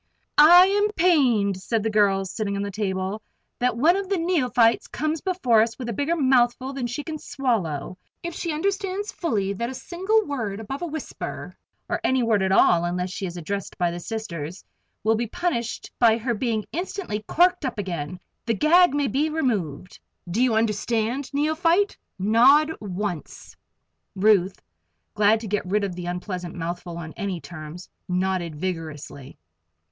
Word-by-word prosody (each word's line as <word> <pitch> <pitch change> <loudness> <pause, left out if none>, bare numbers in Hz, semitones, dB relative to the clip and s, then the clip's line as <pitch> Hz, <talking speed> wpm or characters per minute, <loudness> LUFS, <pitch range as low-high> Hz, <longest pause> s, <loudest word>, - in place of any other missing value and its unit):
"I 350 +4 +9
am 410 +2 +2
pained," 255 - +3
said 215 +3 -1
the 220 - 0
girl 200 -2 +3
sitting 200 +1 -3
on 200 - -2
the 200 - -4
table, 190 0 -2 0.4
"that 245 -2 +1
one 320 +9 +4
of 390 -1 -3
the 395 - +1
neophytes 255 -9 +2
comes 310 +1 -2
before 310 - +3
us 225 0 -1
with 245 -2 -5
a - - -2
bigger 285 +9 0
mouthful 260 -2 +2
than 260 -3 -3
she 250 +5 -4
can 310 -1 -5
swallow. 185 - -2 0.2
If 340 0 -4
she 335 - -3
understands 390 +4 -2
fully 205 - -1
that 235 +4 -3
a 260 - -6
single 385 - 0
word 225 -8 -3
above 270 +7 -6
a 350 - -2
whisper 315 -1 -6 0.3
or - - -2
any 260 -1 +2
word 220 -3 +2
at 190 0 +1
all 175 -3 +5
unless 180 +1 -2
she 190 0 -4
is 175 0 -7
addressed 195 +4 -5
by 175 -1 +1
the 175 - -5
Sisters 175 -5 -6 0.4
will 220 +2 +3
be 230 +1 -1
punished 240 -5 -3
by 230 -2 +5
her 235 +1 -1
being 220 -1 -1
instantly 345 - -4
corked 355 0 +3
up 255 -4 -3
again, 180 -4 -4 0.3
the 230 - +2
gag 335 - +5
may 290 -1 +1
be 285 +5 0
removed. 205 - -2 0.3
Do 190 +8 -1
you 250 -3 +3
understand, 225 +4 0
Neophyte? 330 +7 +2 0.2
Nod 250 +10 +5
once!" 190 -5 -5 0.6
Ruth, 190 -2 +3 0.5
glad 215 +1 +4
to 225 - -6
get 205 +1 -1
rid 205 +2 +1
of 195 -2 -2
the 175 0 -6
unpleasant 180 0 -5
mouthful 175 0 -5
on 160 -2 -7
any 195 -3 -3
terms, 155 +3 -9 0.2
nodded 180 -3 -1
vigorously. 155 -5 -6
225 Hz, 170 wpm, -24 LUFS, 190-295 Hz, 0.6 s, I